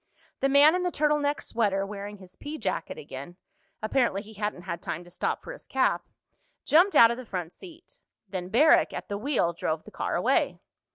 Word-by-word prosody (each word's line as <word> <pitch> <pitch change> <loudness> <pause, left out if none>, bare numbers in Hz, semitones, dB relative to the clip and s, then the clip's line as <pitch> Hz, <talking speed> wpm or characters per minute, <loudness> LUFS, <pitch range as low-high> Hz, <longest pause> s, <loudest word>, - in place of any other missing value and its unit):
The 275 - +2
man 285 +3 +7
in 365 - 0
the 360 - 0
turtle 300 -2 +1
neck 290 0 -1
sweater, 200 -4 0
wearing 205 0 -7
his 185 -1 -12
pea 295 +8 -7
jacket 185 - -3
again—apparently 190 - -4
he 220 0 -13
hadn't 210 -3 -4
had 170 -2 -5
time 170 -2 -4
to 175 - -16
stop 180 - -2
for - - -7
his - - -12
cap—jumped 355 +6 0
out 230 0 +8
of 235 - -3
the 255 - -8
front 180 -3 -4
seat. 360 +7 -13 0.3
Then 185 -1 -5
Barrack, 310 - +5
at - - -6
the 200 - -2
wheel, 230 -9 +1
drove 160 -1 -2
the - - -13
car - - -2
away. - - +1
210 Hz, 190 wpm, -27 LUFS, 185-295 Hz, 0.3 s, out